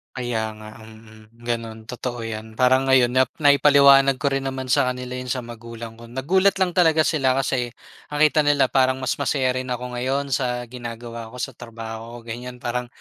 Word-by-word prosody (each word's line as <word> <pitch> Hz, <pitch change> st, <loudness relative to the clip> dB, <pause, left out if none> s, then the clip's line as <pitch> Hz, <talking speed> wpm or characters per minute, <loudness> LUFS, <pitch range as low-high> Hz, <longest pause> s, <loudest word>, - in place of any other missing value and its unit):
Kaya 115 Hz, -4 st, -3 dB
nga, 110 Hz, +1 st, -12 dB
mm. 110 Hz, +1 st, -16 dB
Gano'n, 115 Hz, -2 st, -4 dB
totoo 120 Hz, -1 st, -5 dB
'yan. 110 Hz, 0 st, -6 dB
Parang 130 Hz, +2 st, +3 dB
ngayon, 130 Hz, -2 st, +4 dB
nap 130 Hz, 0 st, +3 dB
naipaliwanag 140 Hz, -2 st, +6 dB
ko 135 Hz, +2 st, -1 dB
rin 135 Hz, 0 st, -1 dB
naman 130 Hz, -1 st, -4 dB
sa -, -, +3 dB
kanila 125 Hz, 0 st, -4 dB
'yon 125 Hz, -, -7 dB
sa 125 Hz, 0 st, -2 dB
magulang 115 Hz, -1 st, -9 dB
ko. 115 Hz, -, -11 dB
Nagulat 175 Hz, +11 st, +2 dB
lang 190 Hz, -2 st, +1 dB
talaga 160 Hz, -3 st, +4 dB
sila 135 Hz, -5 st, +1 dB
kasi, 130 Hz, -2 st, 0 dB, 0.4 s
nakita 150 Hz, +1 st, +3 dB
nila 145 Hz, -3 st, +3 dB
parang 130 Hz, -1 st, +3 dB
mas 130 Hz, -, -1 dB
masaya 135 Hz, -2 st, +1 dB
rin 130 Hz, 0 st, -4 dB
ako 125 Hz, 0 st, -4 dB
ngayon 135 Hz, +3 st, -2 dB
sa 125 Hz, -1 st, -1 dB
ginagawa 115 Hz, -1 st, -7 dB
ko 115 Hz, -, -13 dB
sa 125 Hz, -, -4 dB
trabaho 115 Hz, 0 st, -9 dB
ko, 115 Hz, -, -8 dB
ganiyan. 125 Hz, +1 st, -8 dB
Parang, 125 Hz, +1 st, -2 dB
125 Hz, 185 wpm, -22 LUFS, 115-135 Hz, 0.4 s, naipaliwanag